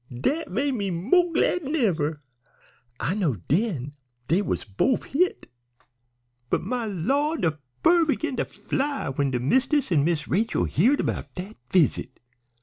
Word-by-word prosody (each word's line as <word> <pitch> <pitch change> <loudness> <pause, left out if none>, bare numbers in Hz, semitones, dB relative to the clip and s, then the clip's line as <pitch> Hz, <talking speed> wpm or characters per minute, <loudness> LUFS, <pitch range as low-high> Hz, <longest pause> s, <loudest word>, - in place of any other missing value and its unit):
Dat 290 - -1
made 270 +8 0
me 200 -5 -2
mo' 260 - +2
glad 355 +2 +2
'n 295 +1 -3
ever. 160 - 0 0.8
I 140 +10 0
knowed 150 - -1
den 150 - 0 0.4
dey 175 +6 +3
was - - -2
bofe 115 - +1
hit. 360 +7 0 1.0
"But - - 0
my 235 +3 -2
lah', 275 - 0
de 160 - -1 0.2
fur 340 0 +5
begin 295 -2 -1
to - - 0
fly 275 - -2
when 140 +1 0
de 125 -2 -1
mist'ess 260 - +1
an' 150 -5 +4
Miss 165 -1 0
Rachel 220 +5 +1
heared 250 - +2
'bout - - -4
dat 190 +4 -7
visit! 150 -7 +1
205 Hz, 150 wpm, -25 LUFS, -, 1.0 s, fur